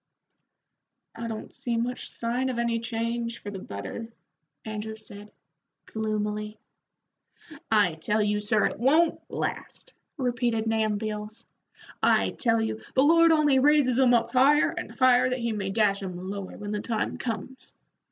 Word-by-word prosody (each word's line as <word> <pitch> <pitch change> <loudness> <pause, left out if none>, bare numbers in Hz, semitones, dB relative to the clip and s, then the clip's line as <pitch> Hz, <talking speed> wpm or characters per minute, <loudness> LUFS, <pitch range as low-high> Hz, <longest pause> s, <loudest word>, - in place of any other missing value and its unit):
"I 230 0 -6
don't 220 -1 -6
see 235 -2 -3
much 245 +2 -3
sign 245 +3 -2
of 250 - -3
any 235 -1 0
change 230 0 -3
for 205 - -8
the 195 - -6
better," 100 - -7 0.5
Andrew 220 0 -5
said, 210 -1 -12 0.5
gloomily. 210 -1 -3 1.1
"I 205 -6 +4
tell 210 +6 0
you, 210 0 +1
sir, 210 +1 +2
it - - -2
won't 310 +7 +3
last," - - -5 0.2
repeated 240 -4 0
Nahum 220 -2 +1
Beals. 215 0 -5 0.6
"I - - +3
tell 230 -2 +1
you, 220 0 -2
the 265 - +5
Lord 330 +2 +6
only 295 -4 +4
raises 275 -3 +4
'em 250 -2 +5
up 230 -1 +1
higher 275 +4 +4
and 350 +1 -6
higher 255 -1 +4
that 255 - -1
He 235 -2 -2
may 200 -3 -3
dash 200 -1 +1
'em 185 -2 -5
lower 200 -1 -6
when 205 0 -6
the 210 -1 -2
time 225 -2 -2
comes. 250 +2 -5
225 Hz, 150 wpm, -27 LUFS, 210-250 Hz, 1.1 s, Lord